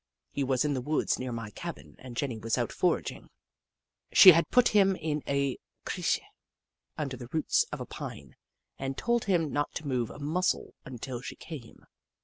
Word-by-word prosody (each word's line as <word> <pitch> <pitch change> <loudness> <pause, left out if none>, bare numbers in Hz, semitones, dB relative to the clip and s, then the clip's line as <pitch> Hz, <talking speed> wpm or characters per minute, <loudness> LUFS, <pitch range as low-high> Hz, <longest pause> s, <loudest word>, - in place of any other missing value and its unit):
He 140 - -1
was 130 +1 +1
in 145 - +1
the 130 - -1
woods 150 +5 0
near 130 -1 -3
my 115 -2 -5
cabin - - -8
and 125 -2 -9
Jenny 125 -6 -2
was 115 -2 -1
out - - -1
foraging. - - -1 0.8
She 185 - +11
had 165 0 +3
put 250 -1 +5
him 195 -2 +4
in 150 -3 -2
a 140 -2 0 0.3
crtche - - 0 0.8
under 140 -4 -3
the 120 -1 -9
roots 160 -1 +2
of - - -4
a - - -4
pine - - -8 0.4
and 135 0 -3
told 235 0 +1
him 170 -7 +1
not 145 0 -1
to 155 - -4
move 125 -4 0
a - - -10
muscle 160 +6 0
until 125 -1 -6
she - - -7
came. 140 -9 -10
140 Hz, 180 wpm, -29 LUFS, 125-160 Hz, 0.8 s, She